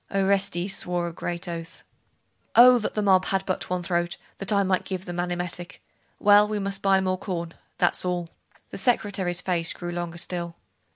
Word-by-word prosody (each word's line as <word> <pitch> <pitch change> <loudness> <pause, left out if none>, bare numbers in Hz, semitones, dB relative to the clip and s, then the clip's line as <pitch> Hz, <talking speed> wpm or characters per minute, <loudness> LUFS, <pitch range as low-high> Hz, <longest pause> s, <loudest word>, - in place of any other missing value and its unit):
Orestes 195 -1 +1
swore 175 -1 -1
a 170 - -5
great 175 +2 -5
oath. 170 0 -7 0.7
'Oh, 250 +1 +8
that 215 - -3
the 210 - 0
mob 190 -2 +4
had 195 0 0
but 185 - -2
one 180 -1 -2
throat, 175 -1 -1 0.2
that 195 +1 +1
I 200 -1 +3
might 185 -1 +1
give 190 -1 -5
them 175 0 -5
an 175 0 -1
emetic! 175 0 -5 0.4
Well, 205 0 +6
we 210 0 -2
must 195 -1 -3
buy 195 -1 +4
more 185 -1 -1
corn, 170 -4 -4 0.2
that's - - +2
all.' 175 -2 -2 0.4
The - - -6
secretary's 195 -7 0
face 175 -2 0
grew 175 -1 -6
longer 175 -1 -4
still. 170 -1 -3
180 Hz, 185 wpm, -25 LUFS, 175-195 Hz, 0.7 s, Oh